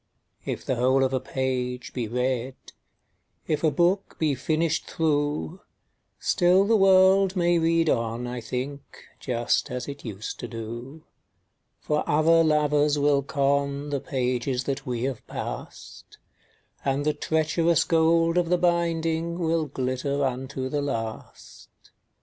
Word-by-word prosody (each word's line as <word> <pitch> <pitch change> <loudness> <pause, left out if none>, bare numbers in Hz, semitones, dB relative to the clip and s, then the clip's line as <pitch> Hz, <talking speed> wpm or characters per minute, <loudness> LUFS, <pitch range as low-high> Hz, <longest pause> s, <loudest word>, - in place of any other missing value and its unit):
II. - - 0
If - - -9
the 130 - -1
whole 130 +2 +3
of 130 0 0
a 130 - +1
page 125 -1 -3
be 120 -3 -3
read, 125 +2 -1 0.9
If 155 0 -1
a 160 - +5
book 180 +5 +1
be 155 -3 +1
finished 155 +4 -1
through, 150 +2 -1 0.6
Still 180 +2 +3
the 225 +2 +3
world 190 -1 +5
may 175 -1 +2
read 165 0 +2
on, 115 -2 0
I 120 0 -5
think, 135 +4 -4 0.4
Just 120 -2 0
as 125 0 -4
it 140 0 -8
used 110 -2 -6
to 120 - -5
do; 120 +6 -8 0.8
For 150 - 0
other 165 +2 +4
lovers 150 -1 +2
will 145 -1 +3
con 140 +1 -1
The 140 - 0
pages 125 -1 -1
that 135 -1 -4
we 120 -1 -2
have 130 -3 -4
passed, - - -8 0.7
And 140 +1 0
the 150 - +2
treacherous 160 +2 +1
gold 165 +1 +3
of 170 -2 -1
the 180 - +3
binding 170 -1 0
Will 165 -2 0
glitter 135 +1 -2
unto 130 0 -3
the 145 +2 -2
last. 115 -6 -6
145 Hz, 140 wpm, -25 LUFS, 130-165 Hz, 0.9 s, a